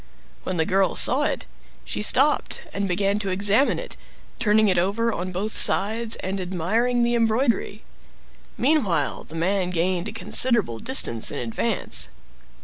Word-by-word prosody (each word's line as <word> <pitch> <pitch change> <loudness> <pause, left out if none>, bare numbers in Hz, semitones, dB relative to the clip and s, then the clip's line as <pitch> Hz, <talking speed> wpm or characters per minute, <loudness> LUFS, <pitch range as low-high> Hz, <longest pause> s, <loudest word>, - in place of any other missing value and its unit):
When 185 - -4
the 160 - +1
girl 190 +2 +1
saw 260 +3 +4
it, - - -2 0.4
she - - -4
stopped 270 +7 +2
and 200 0 -2
began 195 +3 0
to 200 -2 -3
examine 205 +8 +2
it; - - -8 0.4
turning 215 -1 +3
it 185 -3 +2
over 220 +6 0
on 185 +1 -4
both 200 +4 -4
sides, 220 +3 +1
and 190 +1 -4
admiring 215 +8 -1
the 240 0 +1
embroidery. 230 -2 0 0.7
Meanwhile 215 - 0
the 155 - -12
man 180 +2 -1
gained 180 +1 -1
a - - -5
considerable 225 - +2
distance 120 - +3
in - - -4
advance. 120 - -2
200 Hz, 145 wpm, -23 LUFS, 185-230 Hz, 0.7 s, saw